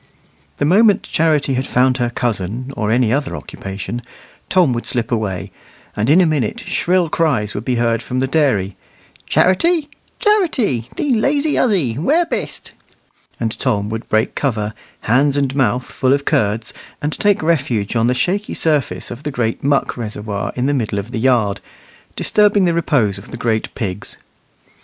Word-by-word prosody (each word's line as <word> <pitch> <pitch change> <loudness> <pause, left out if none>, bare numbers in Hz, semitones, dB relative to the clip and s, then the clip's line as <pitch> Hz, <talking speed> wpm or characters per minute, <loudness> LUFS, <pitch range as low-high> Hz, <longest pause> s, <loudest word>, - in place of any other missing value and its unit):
The 145 - 0
moment 205 +5 +4
Charity 155 -4 +1
had 130 +1 -1
found 125 +1 +2
her 120 -2 0
cousin, 120 +2 -3
or 105 -4 -1
any 120 0 +2
other 140 0 -1
occupation, 100 +5 -6 0.5
Tom 175 -9 +3
would 120 - -4
slip 120 +1 -2
away; 100 -7 -2 0.4
and 105 +4 0
in 160 +5 +6
a - - +4
minute 150 -9 0
shrill 180 0 +1
cries 140 -11 0
would 105 - -5
be 125 - 0
heard 115 -1 +1
from 125 +2 -3
the 130 - +2
dairy, 130 - +1 0.5
"Charity, 300 - +2 0.3
Charity, 305 - +1
thee 285 -3 0
lazy 285 +6 +1
huzzy, 160 - +1
where 310 - +2
bist?" 335 - -4 0.7
and 115 -2 -2
Tom 105 -6 0
would 115 +1 -5
break 110 +2 +1
cover, 110 -6 -1 0.3
hands 135 +5 +2
and 135 -2 0
mouth 125 -2 +1
full 130 0 +1
of 140 0 0
curds, 110 -6 0 0.3
and 150 +1 -2
take 205 -5 +1
refuge 125 -10 0
on 115 0 +3
the 125 - +2
shaky 200 +9 -1
surface 150 -4 0
of 120 +2 -7
the 150 - -3
great 120 -5 -2
muck 140 -1 +1
reservoir 105 -3 -4
in 125 - -1
the 145 - +2
middle 110 -6 -1
of 100 +4 -4
the 120 - -3
yard, 115 -5 +2 0.5
disturbing 205 -2 +3
the 170 - +2
repose 130 -12 +1
of 100 - -13
the - - -7
great 115 -2 -1
pigs. 100 -3 -4
130 Hz, 170 wpm, -18 LUFS, 110-160 Hz, 0.7 s, in